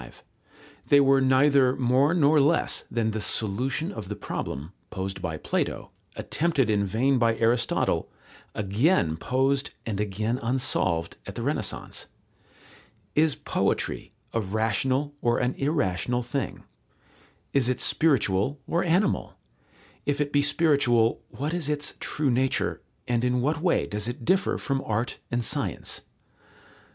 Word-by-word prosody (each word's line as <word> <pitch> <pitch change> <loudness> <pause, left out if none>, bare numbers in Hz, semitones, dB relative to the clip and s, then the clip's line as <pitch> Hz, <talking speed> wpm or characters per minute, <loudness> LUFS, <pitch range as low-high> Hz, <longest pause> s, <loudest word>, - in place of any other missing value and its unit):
They 145 - +6
were 135 -1 +4
neither 130 0 +4
more 130 +5 +2
nor 155 -2 +4
less 150 +4 +2
than 115 -2 0
the 110 0 -3
solution 125 - -1
of 105 - -7
the 105 - -3
problem, 75 0 -5 0.2
posed 95 -1 -5
by 80 -3 -3
Plato, - - -2 0.2
attempted 150 -8 0
in 100 -1 +1
vain 125 +7 +2
by 115 -1 +2
Aristotle, 115 +1 +1 0.5
again 105 - +1
posed 135 - 0
and 105 -3 -3
again 105 +4 -1
unsolved 95 -9 0
at - - -7
the - - -4
Renaissance. - - -2 1.1
Is 155 0 +3
poetry - - -1 0.2
a 115 - +1
rational 110 +8 0
or 120 0 +2
an 125 +1 0
irrational 125 - -1
thing? 130 +3 -4 0.9
Is 130 -3 +2
it 130 - -1
spiritual 135 -3 +2
or 170 - +1
animal? 180 +4 +1 0.7
If 145 0 0
it 145 -1 -1
be 145 - +4
spiritual, 140 -7 +3
what 150 +4 -4
is 170 -4 -2
its 150 0 -1
true 145 -3 0
nature, 130 +2 0 0.3
and 120 -1 0
in 125 0 +1
what 150 +5 0
way 180 -1 +2
does 105 +1 -3
it 120 0 -6
differ 190 +6 +2
from 135 -1 -2
art 110 +3 -2
and 120 -1 -1
science? - - -1
125 Hz, 135 wpm, -26 LUFS, 110-145 Hz, 1.1 s, They